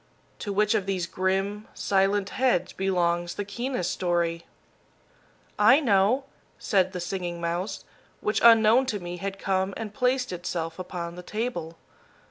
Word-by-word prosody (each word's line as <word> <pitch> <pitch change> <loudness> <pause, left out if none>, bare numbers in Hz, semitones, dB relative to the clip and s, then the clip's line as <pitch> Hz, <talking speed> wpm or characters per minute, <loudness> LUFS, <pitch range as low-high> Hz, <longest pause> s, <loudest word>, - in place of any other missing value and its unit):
To 205 - -4
which 210 +2 +2
of 205 -3 0
these 185 -3 -1
grim, 195 +4 -1
silent 195 0 +1
heads 245 -9 +1
belongs 175 -2 0
the 205 - -3
keenest 235 -1 -2
story?" 170 -2 -1 1.1
"I 265 +3 +7
know," 225 0 +3 0.3
said 190 -3 +1
the 180 - -4
Singing 175 -1 -4
Mouse, 175 +4 -3 0.3
which 210 - 0
unknown 230 +2 +6
to 210 -5 -2
me 175 0 -6
had 195 +2 -4
come 190 0 -1
and 215 -2 -6
placed 255 0 +1
itself 170 -1 -4
upon 175 -2 -5
the - - -6
table. 180 -6 -4
195 Hz, 140 wpm, -26 LUFS, 175-215 Hz, 1.1 s, I